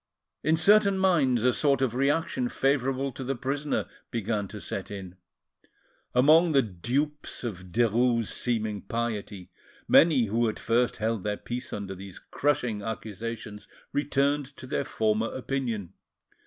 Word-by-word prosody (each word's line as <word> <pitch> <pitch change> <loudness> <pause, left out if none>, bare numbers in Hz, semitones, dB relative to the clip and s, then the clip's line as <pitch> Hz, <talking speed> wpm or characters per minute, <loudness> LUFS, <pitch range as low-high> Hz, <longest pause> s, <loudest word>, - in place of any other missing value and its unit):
In 160 +2 +3
certain 200 +3 +5
minds 150 - +3
a 125 0 +4
sort 140 0 +2
of 130 -4 +1
reaction 165 - 0
favourable 135 - 0
to 130 - -7
the 135 +2 -2
prisoner 140 +4 -2 0.2
began 110 -2 -2
to 105 +2 -8
set 100 -1 -5
in. 95 -3 -7 1.0
Among 155 +6 +6
the 135 -2 +5
dupes 130 - -2
of 95 -6 -6
Derues' 120 +1 +2
seeming 110 -4 -2
piety, 105 -5 -4 0.4
many 150 -7 +6
who 115 +2 +1
at 110 - -5
first 120 +1 +1
held 110 -2 -1
their 105 0 -1
peace 120 +1 -5
under 100 -2 -4
these 95 0 -9
crushing 125 -7 -1
accusations 110 0 -6 0.3
returned 140 -1 0
to - - -9
their 135 +1 -2
former 110 0 0
opinion. 120 -8 -3
120 Hz, 140 wpm, -27 LUFS, 110-140 Hz, 1.0 s, Among